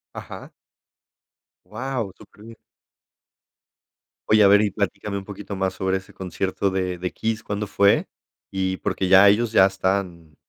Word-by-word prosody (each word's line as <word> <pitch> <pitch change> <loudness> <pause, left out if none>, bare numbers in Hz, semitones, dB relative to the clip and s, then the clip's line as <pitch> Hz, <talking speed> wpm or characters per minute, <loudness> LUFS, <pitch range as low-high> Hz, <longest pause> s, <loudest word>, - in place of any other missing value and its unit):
Ajá. - - -9 1.2
¡Guau! 115 +1 -4
Súper 105 - -17
bien. 115 0 -12 1.7
Oye, 110 0 +5
a - - +7
ver, 100 +1 +5
y 105 - 0
platícame 100 0 -3
un - - -10
poquito 100 0 -8
más 95 -1 -2
sobre 95 0 -1
ese 95 - -12
concierto 95 +1 -3
de 90 -1 -2
de 90 +1 -4
Kiss, 110 0 -3
¿cuándo 105 0 -4
fue? 100 0 +3 0.4
Y 95 -1 -2
porque 95 - -2
ya 95 +2 +7
ellos 110 +3 +1
ya 95 -4 +6
están 95 -4 -3
100 Hz, 150 wpm, -23 LUFS, 95-105 Hz, 1.7 s, a